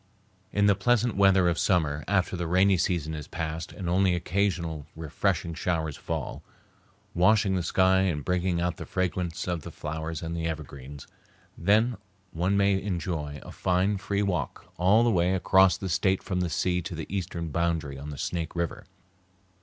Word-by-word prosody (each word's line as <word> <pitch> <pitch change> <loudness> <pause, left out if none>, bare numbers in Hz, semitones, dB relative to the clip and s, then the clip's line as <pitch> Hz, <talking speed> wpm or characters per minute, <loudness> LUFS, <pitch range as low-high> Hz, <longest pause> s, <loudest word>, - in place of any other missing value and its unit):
In 100 0 +2
the 100 - +6
pleasant 120 +4 +1
weather 95 -2 +5
of 85 -1 +1
summer, 75 -6 +1
after 95 -2 +1
the 85 -1 -3
rainy 95 +3 +4
season 85 -3 -1
is 75 -2 -6
past 80 +1 -4
and 95 -4 -6
only 90 +1 +3
occasional 85 -4 -1
refreshing 80 +1 -1
showers 80 -2 -1
fall, - - -4 0.7
washing 100 +2 +4
the 95 - +1
sky 95 +2 +3
and 85 -7 0
bringing 90 -1 0
out 90 -1 -1
the - - -7
fragrance 90 -2 -2
of 85 -2 -1
the - - -8
flowers 80 +1 -5
and 85 +1 -3
the 85 -1 -2
evergreens, 70 -3 -7 0.5
then 110 +7 +2 0.3
one 90 +5 0
may 100 -1 +3
enjoy 80 -6 -3
a - - -10
fine, 95 +3 +1
free 100 0 -1
walk 95 -4 -3
all 100 +6 +4
the 120 - +3
way 90 -1 +2
across 95 0 +4
the 95 - -5
State 95 +2 +1
from 90 -2 -2
the 90 -1 0
sea 90 +3 0
to 90 0 -6
the 80 - -5
eastern 85 -3 -3
boundary 80 -3 -1
on 75 +2 -7
the 75 - -7
Snake 85 +2 -3
River. 85 -1 -3
90 Hz, 175 wpm, -27 LUFS, 80-95 Hz, 0.7 s, the